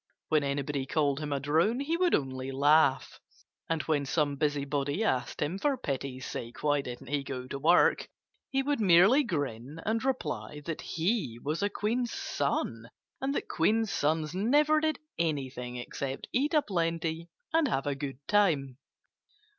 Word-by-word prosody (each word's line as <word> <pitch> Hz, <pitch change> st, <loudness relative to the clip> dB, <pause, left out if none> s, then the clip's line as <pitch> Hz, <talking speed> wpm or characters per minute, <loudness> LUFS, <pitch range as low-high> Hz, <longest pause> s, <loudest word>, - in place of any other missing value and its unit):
When 155 Hz, -2 st, +3 dB
anybody 140 Hz, -1 st, -2 dB
called 145 Hz, -2 st, +1 dB
him 150 Hz, -1 st, -4 dB
a 140 Hz, -, 0 dB
drone 160 Hz, -, +2 dB
he 295 Hz, +4 st, 0 dB
would 355 Hz, 0 st, +3 dB
only 130 Hz, -1 st, -3 dB
laugh. 140 Hz, 0 st, +3 dB, 0.5 s
And 165 Hz, -1 st, 0 dB
when 145 Hz, -3 st, 0 dB
some 145 Hz, -1 st, +1 dB
busybody 145 Hz, +4 st, -1 dB
asked 125 Hz, -, 0 dB
him 170 Hz, +7 st, -3 dB
for 280 Hz, +3 st, +1 dB
pity's 135 Hz, -, -4 dB
sake 115 Hz, 0 st, -6 dB
why 145 Hz, -1 st, +3 dB
didn't 125 Hz, 0 st, -8 dB
he 145 Hz, -1 st, 0 dB
go 130 Hz, -2 st, -5 dB
to 135 Hz, +2 st, -5 dB
work, 170 Hz, +5 st, +4 dB, 0.4 s
he 270 Hz, 0 st, +1 dB
would 285 Hz, -1 st, 0 dB
merely 195 Hz, -, +6 dB
grin 145 Hz, -, -3 dB
and 225 Hz, +1 st, 0 dB
reply 150 Hz, -, -2 dB
that 165 Hz, -2 st, -4 dB
he 170 Hz, -, -1 dB
was 150 Hz, +8 st, -2 dB
a 205 Hz, -, +2 dB
queen's 230 Hz, +4 st, -1 dB
son 115 Hz, -5 st, -2 dB, 0.3 s
and 275 Hz, +1 st, -1 dB
that -, -, -2 dB
queens' 215 Hz, +5 st, +1 dB
sons 155 Hz, -1 st, 0 dB
never 295 Hz, +11 st, +3 dB
did 310 Hz, 0 st, 0 dB, 0.2 s
anything 135 Hz, -6 st, -2 dB
except 130 Hz, +2 st, -5 dB
eat 290 Hz, +5 st, +1 dB
a 300 Hz, -, +4 dB
plenty 165 Hz, -2 st, -2 dB, 0.2 s
and 325 Hz, -2 st, +4 dB
have 135 Hz, -, -1 dB
a 145 Hz, -, 0 dB
good 135 Hz, -1 st, -5 dB
time. 150 Hz, -11 st, +2 dB
150 Hz, 160 wpm, -30 LUFS, 135-205 Hz, 0.5 s, merely